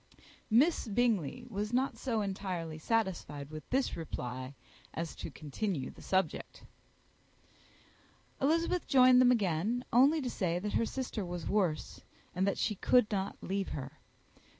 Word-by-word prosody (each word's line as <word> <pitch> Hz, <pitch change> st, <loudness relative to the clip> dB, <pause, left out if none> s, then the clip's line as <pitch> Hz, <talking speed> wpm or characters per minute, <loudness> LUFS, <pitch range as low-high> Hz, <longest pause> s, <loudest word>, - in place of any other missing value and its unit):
Miss 265 Hz, +5 st, +3 dB
Bingley 230 Hz, -, 0 dB
was 210 Hz, -2 st, -3 dB
not 260 Hz, +2 st, +1 dB
so 230 Hz, -5 st, -1 dB
entirely 185 Hz, -5 st, -4 dB
satisfied 160 Hz, -8 st, -1 dB
with 155 Hz, 0 st, -9 dB
this 265 Hz, +1 st, +1 dB
reply 130 Hz, -4 st, -5 dB, 0.4 s
as 165 Hz, -1 st, -3 dB
to -, -, -5 dB
continue 155 Hz, -1 st, -3 dB
the -, -, -15 dB
subject. 190 Hz, 0 st, -1 dB, 1.8 s
Elizabeth 330 Hz, +5 st, +1 dB
joined 255 Hz, -2 st, +7 dB
them 250 Hz, -1 st, +6 dB
again 215 Hz, +2 st, 0 dB
only 275 Hz, +7 st, +6 dB
to 265 Hz, -, -3 dB
say 175 Hz, -4 st, 0 dB
that 205 Hz, +3 st, -3 dB
her 230 Hz, -, +2 dB
sister 250 Hz, -5 st, -3 dB
was 175 Hz, -2 st, -5 dB
worse, 180 Hz, -7 st, 0 dB, 0.3 s
and 185 Hz, +2 st, +1 dB
that 200 Hz, -, 0 dB
she 215 Hz, -, 0 dB
could 225 Hz, +3 st, +3 dB
not 195 Hz, -1 st, -2 dB
leave 195 Hz, 0 st, -2 dB
her. 135 Hz, -1 st, -8 dB
200 Hz, 140 wpm, -32 LUFS, 170-245 Hz, 1.8 s, joined